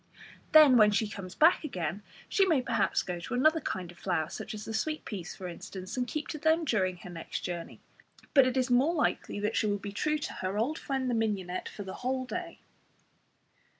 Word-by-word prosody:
Then 300 Hz, -5 st, +8 dB
when 215 Hz, -2 st, +7 dB
she 210 Hz, +1 st, +1 dB
comes 195 Hz, -3 st, -8 dB
back 325 Hz, +3 st, +5 dB
again 185 Hz, -, -3 dB, 0.3 s
she 395 Hz, -, +3 dB
may 330 Hz, -7 st, +3 dB
perhaps -, -, +1 dB
go 175 Hz, -1 st, -4 dB
to 170 Hz, -, -4 dB
another 310 Hz, +5 st, +4 dB
kind 180 Hz, -2 st, -4 dB
of 175 Hz, -, -18 dB
flower, 165 Hz, -4 st, -1 dB
such 215 Hz, -, -6 dB
as 210 Hz, -, -7 dB
the 225 Hz, -, -5 dB
sweet 305 Hz, +8 st, -2 dB
peas, 185 Hz, -6 st, -6 dB
for 185 Hz, -, -7 dB
instance, 185 Hz, +3 st, -7 dB
and 250 Hz, -1 st, -1 dB
keep 300 Hz, +4 st, -3 dB
to 305 Hz, -, -4 dB
them 320 Hz, +2 st, +2 dB
during 185 Hz, -, 0 dB
the -, -, -8 dB
next 165 Hz, -1 st, -5 dB
journey, 175 Hz, -2 st, -6 dB, 0.5 s
but 270 Hz, -3 st, +7 dB
it 255 Hz, 0 st, -1 dB
is 255 Hz, 0 st, +1 dB
more 275 Hz, +8 st, +4 dB
likely 295 Hz, -8 st, 0 dB
that 210 Hz, +2 st, -1 dB
she 215 Hz, -, +2 dB
will 205 Hz, 0 st, +1 dB
be 200 Hz, 0 st, -7 dB
true 305 Hz, +9 st, 0 dB
to 300 Hz, -, -5 dB
her 190 Hz, +2 st, -2 dB
old 265 Hz, +9 st, 0 dB
friend 265 Hz, -2 st, -2 dB
the 245 Hz, -, 0 dB
mignonette 200 Hz, -5 st, -1 dB
for 205 Hz, -, -7 dB
the 190 Hz, -, -7 dB
whole 255 Hz, +1 st, -1 dB
day. 345 Hz, +5 st, -5 dB
225 Hz, 220 wpm, -30 LUFS, 190-295 Hz, 0.5 s, Then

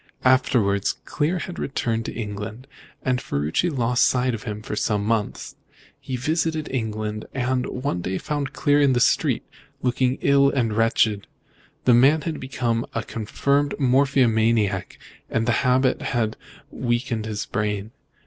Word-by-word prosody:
Afterwards, 120 Hz, -6 st, +3 dB
Clear 155 Hz, +5 st, 0 dB
had 175 Hz, 0 st, -6 dB
returned 115 Hz, -4 st, -2 dB
to -, -, -4 dB
England, 110 Hz, +2 st, -6 dB, 0.4 s
and 130 Hz, -1 st, 0 dB
Ferruci 75 Hz, -, 0 dB
lost 125 Hz, -4 st, +1 dB
sight 125 Hz, 0 st, +2 dB
of 110 Hz, -, -6 dB
him 105 Hz, 0 st, -5 dB
for 105 Hz, -, -4 dB
some 105 Hz, -1 st, 0 dB
months. 110 Hz, -2 st, -1 dB
Then -, -, -29 dB, 0.4 s
he 130 Hz, -, -5 dB
visited 155 Hz, +4 st, -1 dB
England, 110 Hz, -3 st, -3 dB
and 125 Hz, 0 st, 0 dB
one 125 Hz, -8 st, -3 dB
day 95 Hz, +2 st, -2 dB
found 145 Hz, -3 st, -3 dB
Clear 145 Hz, 0 st, +2 dB
in 140 Hz, -2 st, +4 dB
the 120 Hz, -, +2 dB
street, -, -, +2 dB, 0.4 s
looking 125 Hz, +1 st, +1 dB
ill 140 Hz, 0 st, +5 dB
and 120 Hz, -6 st, 0 dB
wretched. 110 Hz, -2 st, +2 dB, 0.6 s
The 125 Hz, -, +6 dB
man 135 Hz, +6 st, +5 dB
had 160 Hz, -3 st, -3 dB
become 120 Hz, -3 st, -1 dB
a 115 Hz, -, -1 dB
confirmed 140 Hz, +7 st, 0 dB
morphiamaniac, 115 Hz, -7 st, +2 dB, 0.3 s
and 115 Hz, 0 st, 0 dB
the -, -, +4 dB
habit 130 Hz, 0 st, +2 dB
had 110 Hz, -3 st, -1 dB, 0.4 s
weakened 120 Hz, -2 st, -1 dB
his 105 Hz, -1 st, -3 dB
brain. 105 Hz, 0 st, -2 dB
120 Hz, 150 wpm, -23 LUFS, 110-135 Hz, 0.6 s, The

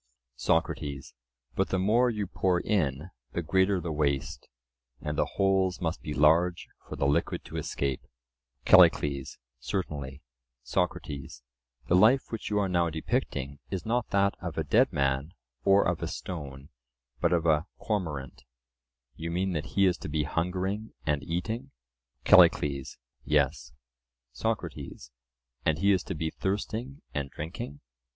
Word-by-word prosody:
SOCRATES: 70 Hz, +2 st, -1 dB, 0.4 s
But -, -, 0 dB
the 95 Hz, -, +1 dB
more 110 Hz, +7 st, +3 dB
you 105 Hz, -3 st, -2 dB
pour 90 Hz, -1 st, +1 dB
in, 80 Hz, -5 st, -1 dB, 0.2 s
the 85 Hz, -, -2 dB
greater 95 Hz, +3 st, +2 dB
the 85 Hz, -1 st, -4 dB
waste; 70 Hz, -4 st, -1 dB, 0.5 s
and 75 Hz, 0 st, -3 dB
the -, -, +1 dB
holes 95 Hz, -2 st, +2 dB
must 85 Hz, -2 st, -2 dB
be 75 Hz, -, -6 dB
large 80 Hz, +4 st, +3 dB, 0.2 s
for -, -, -5 dB
the -, -, -1 dB
liquid 70 Hz, +1 st, 0 dB
to -, -, -7 dB
escape. 70 Hz, -2 st, -2 dB, 0.6 s
CALLICLES: 70 Hz, -2 st, +5 dB, 0.2 s
Certainly. 75 Hz, -7 st, -4 dB, 0.4 s
SOCRATES: 70 Hz, -3 st, -3 dB, 0.4 s
The 85 Hz, -, +3 dB
life 115 Hz, +8 st, +5 dB
which 115 Hz, -, -4 dB
you 105 Hz, -, 0 dB
are 100 Hz, -1 st, +2 dB
now 85 Hz, -2 st, +2 dB
depicting 80 Hz, -, -2 dB
is 95 Hz, -3 st, -4 dB
not 120 Hz, +1 st, 0 dB
that 100 Hz, 0 st, +3 dB
of 85 Hz, -4 st, -5 dB
a 80 Hz, -, +1 dB
dead 115 Hz, -, +3 dB
man, 70 Hz, +1 st, 0 dB, 0.3 s
or 100 Hz, +1 st, +5 dB
of -, -, -1 dB
a -, -, -2 dB
stone, 70 Hz, -5 st, -7 dB, 0.5 s
but -, -, +2 dB
of 85 Hz, -1 st, +2 dB
a 80 Hz, -1 st, +3 dB
cormorant; 75 Hz, -, -3 dB, 0.7 s
you 80 Hz, +3 st, -5 dB
mean 95 Hz, +3 st, 0 dB
that 75 Hz, -2 st, -2 dB
he 100 Hz, -, +6 dB
is 90 Hz, -2 st, +2 dB
to -, -, -6 dB
be 75 Hz, 0 st, 0 dB
hungering 95 Hz, +7 st, -2 dB
and 75 Hz, -2 st, +1 dB
eating? 90 Hz, -, -3 dB, 0.5 s
CALLICLES: 70 Hz, -2 st, +5 dB, 0.3 s
Yes. 70 Hz, -3 st, +1 dB, 0.6 s
SOCRATES: 80 Hz, -, -4 dB, 0.5 s
And 80 Hz, -1 st, +2 dB
he 100 Hz, +4 st, +3 dB
is 95 Hz, -3 st, +3 dB
to 95 Hz, -, -4 dB
be 80 Hz, 0 st, -2 dB
thirsting 110 Hz, +8 st, -3 dB
and 70 Hz, -2 st, -2 dB
drinking? 75 Hz, -2 st, -7 dB
85 Hz, 145 wpm, -28 LUFS, 70-95 Hz, 0.7 s, he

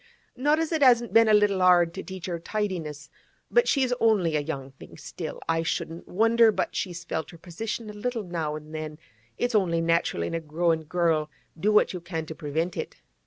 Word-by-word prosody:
'Not 295 Hz, +4 st, +2 dB
as 325 Hz, 0 st, -1 dB
it 320 Hz, -2 st, 0 dB
hasn't 240 Hz, -3 st, +5 dB
been 225 Hz, 0 st, +6 dB
a -, -, +5 dB
little 205 Hz, -2 st, +3 dB
'ard 175 Hz, -2 st, +5 dB
to 190 Hz, -, -5 dB
teach 190 Hz, -2 st, -8 dB
her 175 Hz, -2 st, -3 dB
tidiness, 165 Hz, -7 st, -4 dB, 0.4 s
but 480 Hz, 0 st, +4 dB
she's 260 Hz, -3 st, +2 dB
only 195 Hz, -8 st, +3 dB
a -, -, +3 dB
young 140 Hz, -3 st, -5 dB
thing 135 Hz, -, -14 dB
still. -, -, -7 dB
I 165 Hz, 0 st, +1 dB
shouldn't 165 Hz, 0 st, -3 dB
wonder 225 Hz, +3 st, +4 dB
but -, -, -2 dB
she's 175 Hz, -3 st, -3 dB
felt 160 Hz, -1 st, -4 dB
her 170 Hz, -, -12 dB
position 215 Hz, +7 st, -5 dB
a 210 Hz, -, -7 dB
little 230 Hz, +2 st, -3 dB
now 165 Hz, -4 st, -3 dB
an' 155 Hz, 0 st, -9 dB
then; 155 Hz, -1 st, -6 dB, 0.4 s
it's 245 Hz, 0 st, -1 dB
only 180 Hz, -6 st, +2 dB
natural 165 Hz, -, +1 dB
in -, -, -3 dB
a 165 Hz, -, 0 dB
growin' 160 Hz, +1 st, 0 dB
girl, 160 Hz, -2 st, +1 dB, 0.3 s
do 195 Hz, +7 st, +1 dB
what 210 Hz, -, +4 dB
you 180 Hz, -, -5 dB
can 165 Hz, -2 st, -4 dB
to 160 Hz, -, -7 dB
prevent 160 Hz, +4 st, -3 dB
it. -, -, -5 dB
175 Hz, 210 wpm, -26 LUFS, 160-215 Hz, 0.4 s, been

